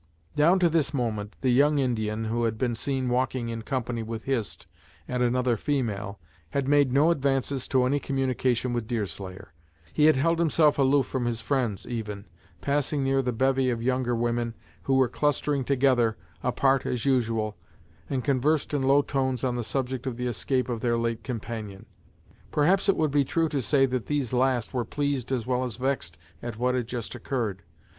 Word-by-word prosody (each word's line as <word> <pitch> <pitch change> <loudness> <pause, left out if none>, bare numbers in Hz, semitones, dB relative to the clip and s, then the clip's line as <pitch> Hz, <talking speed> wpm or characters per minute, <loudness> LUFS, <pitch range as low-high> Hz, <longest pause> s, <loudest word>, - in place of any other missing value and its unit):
Down 165 +6 +5
to 180 -2 +4
this 155 -3 +1
moment, 110 -5 -2
the 130 - +2
young 145 +4 +4
Indian 110 -4 -1
who 115 +1 0
had 110 -1 -1
been 120 0 0
seen 130 +2 -2
walking 125 -1 0
in 115 -1 -4
company 120 -1 -2
with 110 0 -5
Hist 125 -6 -2 0.4
and 125 0 -2
another 125 -1 +2
female 110 -7 -2 0.3
had 140 -1 -1
made 145 -2 +4
no 145 +6 +4
advances 135 -3 0
to 130 -2 +2
any 140 +3 +2
communication 130 -3 0
with 120 -2 -2
Deerslayer. 95 -6 -5 0.4
He 150 - +4
had 155 - +6
held 165 +5 +2
himself 155 -2 +3
aloof 135 0 +4
from 130 -1 -2
his 120 -1 -1
friends, 120 -5 -1
even, 105 -4 -5 0.4
passing 140 0 0
near 135 0 +2
the 125 -1 -1
bevy 130 +2 +2
of 115 -2 -2
younger 125 -1 +1
women, 120 0 -1 0.3
who 135 - +2
were 130 -1 +4
clustering 145 +1 0
together, 125 -4 +2 0.2
apart 135 +1 +2
as 120 -3 -2
usual, 115 -5 +1 0.5
and 130 -2 -1
conversed 145 +2 +1
in 145 - +1
low 140 +2 +4
tones 130 -3 -1
on 125 -2 0
the 120 - -2
subject 130 +2 -3
of 120 -3 -3
the 125 - -3
escape 125 +2 -1
of 120 -3 -3
their 120 -1 +1
late 115 -1 -2
companion. 110 -5 -6 0.7
Perhaps 185 +7 +3
it 195 - +5
would 155 -2 +1
be 145 0 +3
true 165 +4 0
to 140 -3 -1
say 135 +2 +3
that 130 -2 -3
these 140 -5 -1
last 125 -2 +1
were 125 -2 0
pleased 140 0 -2
as 125 -4 -1
well 125 0 0
as 125 -4 -3
vexed 125 -11 -2 0.2
at 120 -2 -6
what 125 +2 +1
had 125 -3 -1
just 120 -2 -5
occurred. 110 -9 -3
125 Hz, 185 wpm, -27 LUFS, 115-140 Hz, 0.7 s, had